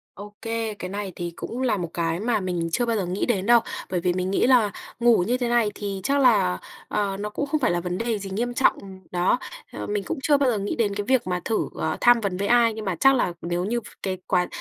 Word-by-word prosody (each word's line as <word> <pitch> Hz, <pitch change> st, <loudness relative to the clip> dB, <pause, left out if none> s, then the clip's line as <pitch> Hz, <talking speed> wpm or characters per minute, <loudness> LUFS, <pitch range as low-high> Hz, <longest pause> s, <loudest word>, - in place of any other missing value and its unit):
OK, 205 Hz, +1 st, -10 dB, 0.4 s
cái 180 Hz, -, -5 dB
này 200 Hz, -1 st, -4 dB
thì 175 Hz, -1 st, -4 dB
cũng 250 Hz, +3 st, -5 dB
là 250 Hz, -5 st, +2 dB
một 175 Hz, -4 st, -4 dB
cái 165 Hz, 0 st, -1 dB
mà 225 Hz, 0 st, +1 dB
mình 175 Hz, -3 st, -2 dB
chưa 240 Hz, -, +1 dB
bao 230 Hz, -1 st, +1 dB
giờ 195 Hz, -, -1 dB
nghĩ 180 Hz, +3 st, -1 dB
đến 195 Hz, 0 st, 0 dB
đâu, 235 Hz, 0 st, +7 dB, 0.3 s
bởi 180 Hz, -1 st, 0 dB
vì 180 Hz, +1 st, +1 dB
mình 185 Hz, +1 st, -2 dB
nghĩ 195 Hz, -, +2 dB
là 245 Hz, -5 st, +5 dB, 0.3 s
ngủ 235 Hz, -5 st, +5 dB
như 245 Hz, +3 st, +1 dB
thế 245 Hz, -, -1 dB
này 235 Hz, -3 st, +2 dB
thì 200 Hz, -2 st, -4 dB
chắc 280 Hz, +1 st, +2 dB
là, 215 Hz, -, +4 dB, 0.3 s
ờ, 200 Hz, -2 st, -1 dB
nó 210 Hz, +1 st, -4 dB
cũng 285 Hz, +7 st, -3 dB
không 300 Hz, +1 st, -1 dB
phải -, -, +2 dB
là 175 Hz, 0 st, 0 dB
vấn 180 Hz, +1 st, -3 dB
đề 230 Hz, -2 st, -1 dB
gì 195 Hz, -1 st, -7 dB
nghiêm 240 Hz, +5 st, -2 dB
trọng. 265 Hz, -, +3 dB, 0.3 s
Đó, 180 Hz, +7 st, +2 dB, 0.3 s
ờ, -, -, -5 dB
mình 205 Hz, -1 st, -2 dB
cũng -, -, -3 dB
chưa 290 Hz, 0 st, +4 dB
bao 275 Hz, -2 st, +2 dB
giờ 220 Hz, -, 0 dB
nghĩ 200 Hz, +1 st, -3 dB
đến 210 Hz, -4 st, +1 dB
cái 205 Hz, 0 st, -3 dB
việc 260 Hz, -5 st, +3 dB
mà 180 Hz, -1 st, -1 dB
thử, 225 Hz, -, 0 dB
ờ, -, -, -2 dB
tham 240 Hz, -1 st, +6 dB
vấn 200 Hz, -4 st, -2 dB
với 200 Hz, +2 st, -1 dB
ai, 235 Hz, -1 st, +5 dB
nhưng 220 Hz, -, -6 dB
mà 190 Hz, -4 st, -1 dB
chắc 270 Hz, 0 st, +6 dB
là 240 Hz, -8 st, +1 dB
nếu 175 Hz, +1 st, -1 dB
như 235 Hz, +4 st, -1 dB
v -, -, -24 dB, 0.2 s
cái 185 Hz, -1 st, -2 dB
quá 180 Hz, -2 st, +2 dB
205 Hz, 270 wpm, -24 LUFS, 185-240 Hz, 0.4 s, đâu